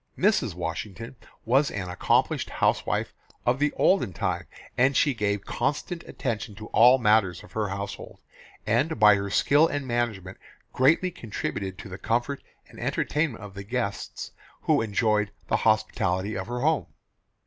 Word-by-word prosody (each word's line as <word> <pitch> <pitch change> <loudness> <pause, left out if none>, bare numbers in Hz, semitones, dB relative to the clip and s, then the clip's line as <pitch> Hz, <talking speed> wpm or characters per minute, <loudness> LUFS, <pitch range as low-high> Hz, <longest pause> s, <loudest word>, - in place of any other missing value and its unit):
Mrs. 190 - +2
Washington 95 +8 -5 0.3
was 135 +5 +3
an 95 -3 -4
accomplished 90 0 +1
house - - +1
wife - - -1 0.3
of 125 +2 +2
the 150 0 +2
olden 155 - +2
time, 85 - -2 0.3
and 130 +2 +3
she 145 - +3
gave 100 -3 -1
constant 150 +7 -2
attention 110 -5 -4
to 105 +2 -9
all 125 +3 +6
matters 105 -6 +2
of - - -15
her 110 -1 -1
household, 100 +1 -6 0.5
and 120 +6 +1
by 105 -1 +8
her 100 0 -1
skill 145 +9 +4
and 145 -3 -3
management 110 -7 -2 0.3
greatly 160 +8 +3
contributed 100 - -5
to - - -9
the 95 0 -8
comfort 120 +4 -1 0.3
and - - -14
entertainment 150 -7 -1
of 100 -2 -9
the 100 - -7
guests 115 -1 -4 0.3
who - - +3
enjoyed 105 -1 +1 0.2
the - - +3
hospitality 95 +4 +1
of 95 +2 -4
her 120 +1 -3
home. 155 +2 +1
115 Hz, 155 wpm, -26 LUFS, 100-135 Hz, 0.5 s, by